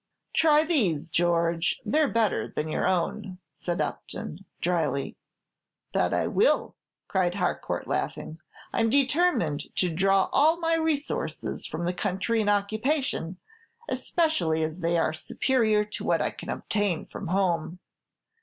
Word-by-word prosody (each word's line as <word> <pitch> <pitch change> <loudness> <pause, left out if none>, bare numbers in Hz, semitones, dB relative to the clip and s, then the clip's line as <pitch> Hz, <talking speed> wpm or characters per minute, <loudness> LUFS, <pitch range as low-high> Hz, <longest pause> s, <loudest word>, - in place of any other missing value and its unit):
"Try 305 -1 +5
these, 195 - 0
George; 170 0 +1
they 305 - +2
're 305 - +4
better 220 - +1
than 155 - -4
your - - 0
own," 185 +2 -1 0.2
said 170 +3 -3
Upton, 185 +6 -5
dryly. 165 -5 -1 0.8
"That - - +2
I - - +1
will," - - +2 0.3
cried 180 -1 +1
Harcourt, 180 -3 -2
laughing; 160 - -3 0.3
"I'm 225 - +2
determined 270 - +2
to 180 -3 +1
draw 195 +3 +3
all 315 +4 +4
my 330 -1 +1
resources 320 -3 -1
from 170 - -4
the 175 - 0
country 195 +5 0
in 205 - +1
occupation, 215 - 0 0.5
especially 175 - +1
as 155 +2 -3
they 170 0 +1
are 160 -1 +1
superior 215 +4 +1
to 210 - -7
what - - +2
I - - 0
can - - -9
obtain 205 -6 -1
from 195 - -7
home. 175 -2 0
190 Hz, 135 wpm, -27 LUFS, 170-260 Hz, 0.8 s, Try